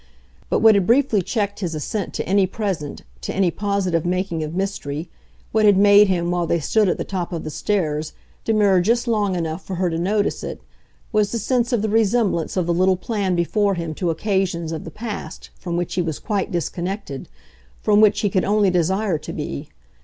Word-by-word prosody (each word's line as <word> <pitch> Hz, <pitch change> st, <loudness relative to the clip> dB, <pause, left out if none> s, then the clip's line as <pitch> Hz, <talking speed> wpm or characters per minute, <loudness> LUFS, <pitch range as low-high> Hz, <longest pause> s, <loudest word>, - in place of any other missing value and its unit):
But -, -, +1 dB
what 225 Hz, -1 st, +7 dB
had 195 Hz, -3 st, +2 dB
briefly 235 Hz, -4 st, +3 dB
checked 205 Hz, +1 st, -2 dB
his 175 Hz, -5 st, -3 dB
assent 190 Hz, +6 st, -3 dB
to -, -, -3 dB
any 195 Hz, 0 st, +3 dB
present, 190 Hz, -8 st, -4 dB, 0.2 s
to -, -, -4 dB
any 190 Hz, -3 st, +2 dB
positive 195 Hz, -4 st, 0 dB
making 180 Hz, -1 st, -1 dB
of 155 Hz, +2 st, -5 dB
mystery 170 Hz, -5 st, -3 dB, 0.4 s
what 220 Hz, 0 st, +2 dB
had 205 Hz, -2 st, +6 dB
made 205 Hz, +1 st, +7 dB
him, 175 Hz, -2 st, 0 dB
while 175 Hz, -1 st, 0 dB
they 170 Hz, -, +1 dB
stood 210 Hz, +6 st, +2 dB
at -, -, 0 dB
the -, -, -2 dB
top 185 Hz, -3 st, -4 dB
of 170 Hz, -2 st, -4 dB
the 155 Hz, -, -5 dB
stairs, 155 Hz, -5 st, -1 dB, 0.3 s
demur 205 Hz, -4 st, +3 dB
just 235 Hz, +6 st, +1 dB
long 210 Hz, -5 st, +1 dB
enough 165 Hz, +1 st, -3 dB
for 190 Hz, -, -5 dB
her 180 Hz, -1 st, 0 dB
to 165 Hz, -, -2 dB
notice 205 Hz, +4 st, 0 dB
it -, -, -5 dB, 0.5 s
was 210 Hz, -2 st, +2 dB
the 235 Hz, -, -1 dB
sense 240 Hz, +2 st, 0 dB
of 235 Hz, -4 st, +1 dB
the -, -, +1 dB
resemblance 215 Hz, -5 st, +1 dB
of 180 Hz, -, +1 dB
the 170 Hz, -, +1 dB
little 185 Hz, +2 st, +3 dB
plan 195 Hz, -2 st, -1 dB
before 200 Hz, +4 st, +1 dB
him 170 Hz, -2 st, -4 dB
to 175 Hz, +2 st, -2 dB
occasions, 175 Hz, -2 st, -1 dB
of 160 Hz, -2 st, -5 dB
the -, -, -6 dB
past, 215 Hz, +5 st, -7 dB
from 175 Hz, -2 st, -3 dB
which 175 Hz, -1 st, -2 dB
he 180 Hz, -, +1 dB
was 160 Hz, -3 st, -2 dB
quite 205 Hz, -4 st, -2 dB
disconnected, 175 Hz, -3 st, -4 dB, 0.5 s
from 210 Hz, 0 st, +3 dB
which 215 Hz, -1 st, +4 dB
he 205 Hz, -, +1 dB
could 185 Hz, -, +2 dB
only 205 Hz, -1 st, +3 dB
desire 180 Hz, 0 st, +1 dB
to -, -, -7 dB
be. 70 Hz, -, -5 dB
190 Hz, 205 wpm, -21 LUFS, 170-210 Hz, 0.5 s, what